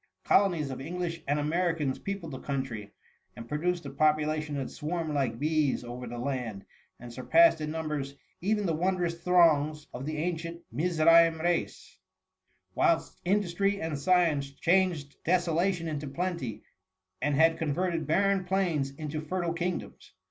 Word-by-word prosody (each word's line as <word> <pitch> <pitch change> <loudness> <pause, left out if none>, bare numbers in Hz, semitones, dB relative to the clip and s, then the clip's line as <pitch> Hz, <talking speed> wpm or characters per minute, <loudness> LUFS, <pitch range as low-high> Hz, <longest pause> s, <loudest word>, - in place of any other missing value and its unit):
Colonies 170 -8 +3
of 130 - -6
English 170 +2 -4
and 145 +1 +1
Americans 160 -2 0
peopled 195 -5 -5
the 130 - -6
country, 130 -7 -4 0.4
and 115 - -9
produced 170 +3 -1
a 140 - -5
population 155 +1 +1
that 135 -2 -4
swarmed 160 0 -3
like 130 -6 0
bees 150 -2 +1
over 120 +1 -7
the 120 +1 -6
land, 120 -6 -4 0.3
and 120 0 -10
surpassed 245 - +4
in 150 - -2
numbers 150 -3 -3 0.3
even 210 +2 +1
the 165 - +1
won 185 +4 +1
drous 170 -1 -2
throngs 155 -4 +3
of 125 +3 -6
the 155 0 -3
ancient 170 +1 -3
Mizraim 165 +3 +4
race; 175 +1 -2 0.7
whilst - - +1
industry 200 +1 +1
and 160 -3 -3
science 155 -3 +2
changed 165 -1 +1
desola 175 +1 +2
tion 170 -3 -5
into 150 -2 -4
plenty, 170 - -3 0.6
and 145 0 +1
had 160 +2 +4
converted 165 0 -1
barren 195 +4 +2
plains 180 -7 0
into 155 0 -4
fertile 170 +1 -2
kingdoms. 175 +1 -4
160 Hz, 150 wpm, -29 LUFS, 140-175 Hz, 0.7 s, surpassed